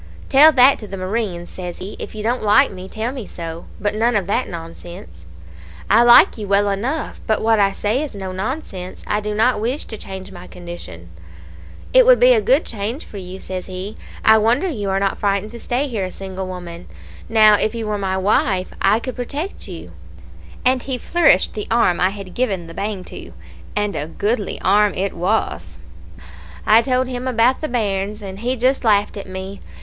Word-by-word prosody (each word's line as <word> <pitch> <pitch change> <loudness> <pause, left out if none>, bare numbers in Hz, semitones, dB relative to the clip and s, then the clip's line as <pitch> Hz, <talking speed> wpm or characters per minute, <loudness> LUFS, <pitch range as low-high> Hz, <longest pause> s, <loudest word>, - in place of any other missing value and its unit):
"'Tell 295 +3 +8
that 265 -1 +5
to 210 - -9
the 195 - -7
marines,' 185 -2 -3
says 180 -2 -7
he. 190 +3 -7
'If - - -7
you 210 - -5
don't 240 +3 0
like 210 -1 +4
me, 185 0 -9
tell 225 +4 -3
me 255 -7 -7
so; 165 -1 -7
but 205 0 -1
none 230 +2 +1
of 200 -3 +1
that 210 +7 -1
nonsense.' 165 - -10 0.7
"'I 220 +3 +6
like 240 -1 +7
you 210 - -5
well 200 +1 +3
enough; 250 +11 -3
but 220 - +2
what 225 -1 +3
I 200 -1 +4
say 215 +6 -1
is 295 -7 -5
no 190 -2 -5
nonsense. 190 - -5
I 210 - 0
do 210 0 -4
not 225 0 +2
wish 250 +6 -2
to 220 - -8
change 190 0 -8
my 180 -1 -11
condition.' 170 - -10 0.8
"'It - - +8
would - - +7
be - - +7
a 445 - +3
good - - +3
change 225 +6 -4
for 205 - -10
you,' 185 0 -8
says 185 -1 -6
he. 185 +2 -6 0.3
'I 220 0 +7
wonder 235 - +2
you 210 - -3
are 195 0 +1
not 195 0 -1
frightened 200 +1 0
to 235 - -9
stay 255 +5 -1
here 225 -7 -3
a - - -5
single 190 0 -6
woman. 175 -2 -8 0.4
Now, 215 -1 +6
if 215 +2 0
you 225 -1 -3
were 210 -1 -2
my 190 -1 -1
wife, 190 -1 +1
I 215 - +4
could 255 +2 -6
protect 285 - -5
you;' - - -9 0.7
and 255 0 +3
he 260 0 -3
flourished 300 - +3
the 210 - -5
arm 225 -7 +2
I 185 - +3
had 195 -2 -9
given 195 -9 -1
the 165 - -10
bang 200 0 -4
to - - -10 0.4
and 210 -1 -1
a 150 - -3
goodly 205 +5 -2
arm 205 +2 +3
it 195 +1 -2
was. 190 +6 -2 0.9
"I 220 +2 +6
told 255 +1 0
him 250 0 -4
about 250 +1 +2
the 310 - -1
bairns, 210 -3 -2
and 190 0 -7
he 245 +3 -1
just 260 +3 +1
laughed 210 -2 +2
at 195 -2 -8
me. 190 +1 -7
210 Hz, 205 wpm, -20 LUFS, 190-240 Hz, 0.9 s, Tell